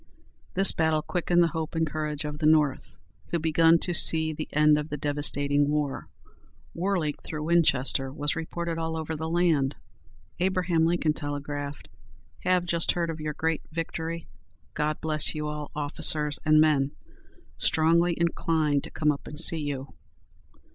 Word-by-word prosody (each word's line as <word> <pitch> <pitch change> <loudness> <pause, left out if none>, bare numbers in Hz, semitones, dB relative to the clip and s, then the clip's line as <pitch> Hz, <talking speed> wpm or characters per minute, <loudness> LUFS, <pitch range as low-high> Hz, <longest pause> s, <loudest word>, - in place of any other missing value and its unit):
This 195 +1 +6
battle 160 -1 0
quickened 175 -1 +1
the 170 - +2
hope 160 0 -4
and 160 0 +1
courage 150 -1 -4
of 150 0 -5
the 155 - +2
North, 150 -3 +1 0.3
who 170 - -1
begun 165 +1 +4
to 175 - -1
see 160 -1 +5
the 155 +1 -5
end 150 0 +4
of 150 +1 -6
the 150 - -4
devastating 145 0 0
war. 150 -2 -2 0.7
"Whirling 175 -4 -1
through 150 -1 -6
Winchester" 140 -5 +1
was 145 +2 -2
reported 165 +1 -4
all 160 0 -3
over 160 0 -4
the 160 +1 -4
land. 165 -5 +1 0.6
Abraham 180 -3 +1
Lincoln 165 -3 +1
telegraphed, 145 - -6 0.5
"Have 180 -1 +1
just 170 -1 +1
heard 170 -1 -1
of 155 -1 -8
your 155 0 -3
great 160 -1 -1
victory. 165 0 -5 0.5
God 150 0 -2
bless 155 -1 +1
you 150 0 -3
all, 150 -1 -5
officers 150 0 0
and 155 -1 +4
men! 145 -3 +2 0.7
Strongly 170 +2 +2
inclined 160 -4 0
to - - -9
come 150 -1 +1
up 140 - -7
and 150 - -8
see 165 0 +6
you." 140 -2 -4
155 Hz, 155 wpm, -26 LUFS, 150-165 Hz, 0.7 s, This